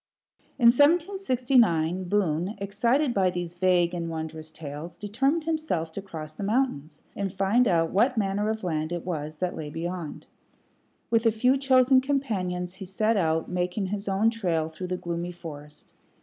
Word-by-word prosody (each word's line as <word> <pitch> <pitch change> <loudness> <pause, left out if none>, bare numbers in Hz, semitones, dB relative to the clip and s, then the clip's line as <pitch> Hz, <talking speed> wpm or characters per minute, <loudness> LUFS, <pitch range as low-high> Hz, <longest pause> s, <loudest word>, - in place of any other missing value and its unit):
In 235 -3 +7
1769 255 - +3
Boone, 180 0 0
excited 235 +8 +1
by 190 -3 +3
these 175 -1 -4
vague 180 -1 +2
and 170 -1 -3
wondrous 160 -1 -6
tales, 155 +2 -8
determined 270 +10 0
himself 310 - -2
to 200 - -6
cross 155 -5 -8
the 155 - -9
mountains 200 - -1
and 195 -2 -2
find 195 +6 +2
out 165 -2 +2
what 235 +6 +2
manner 205 0 0
of 220 -1 -3
land 155 -2 -2
it 175 -1 -4
was 155 -3 -4
that 180 +2 -2
lay 150 -2 -5
beyond. 165 0 -5 0.9
With 230 0 +3
a - - +5
few 250 +5 +3
chosen 260 -1 +4
companions 190 -11 -2
he 190 +1 -8
set 215 +4 +1
out, 160 -4 +1
making 180 +2 -1
his 200 +2 -4
own 200 +4 +2
trail 170 -8 -1
through 180 +3 -7
the 180 0 -2
gloomy 170 0 -4
forest. 150 -4 -11
185 Hz, 165 wpm, -26 LUFS, 165-230 Hz, 0.9 s, In